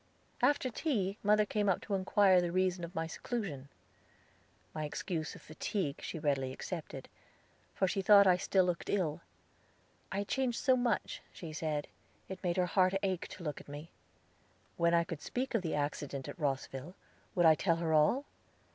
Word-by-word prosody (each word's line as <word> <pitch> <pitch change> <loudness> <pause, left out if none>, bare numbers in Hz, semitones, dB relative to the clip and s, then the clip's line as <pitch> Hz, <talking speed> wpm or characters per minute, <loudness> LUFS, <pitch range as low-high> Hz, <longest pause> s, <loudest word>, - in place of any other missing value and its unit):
After 260 0 +3
tea 210 - -1
mother 210 +1 +4
came 205 -1 0
up 185 - +2
to 205 - -5
inquire 190 -1 +4
the 175 -1 -1
reason 185 -1 +1
of 170 +2 -7
my 160 - -1
seclusion. 160 - -4 1.0
My 155 - -3
excuse 155 +1 -3
of - - -13
fatigue 155 -1 -3
she - - -5
readily 140 -4 0
accepted, 145 -2 -6 0.7
for 190 - +2
she 195 +1 0
thought 200 +1 +7
I 185 -2 +6
still 190 0 +2
looked 175 -2 -2
ill. 170 -5 0 0.9
I 195 - -2
had 200 0 -2
changed 260 -3 0
so 260 -1 +4
much, 245 -3 -1
she 165 -4 -8
said, 155 -2 -2 0.4
it 190 0 -8
made 175 0 0
her 180 - +3
heart 185 +1 +3
ache 185 -3 -1
to - - -10
look 150 -3 -4
at - - -17
me. 145 +3 -8 0.8
When 170 0 +3
I 170 - +4
could 165 -2 -6
speak 255 - -3
of 225 - +2
the 165 -3 -2
accident 145 -2 -3
at - - -8
Rosville, 135 +3 -3 0.4
would 175 -2 +4
I 160 - +9
tell 165 +2 +1
her 165 -1 -1
all? 155 - +4
180 Hz, 180 wpm, -33 LUFS, 155-200 Hz, 1.0 s, I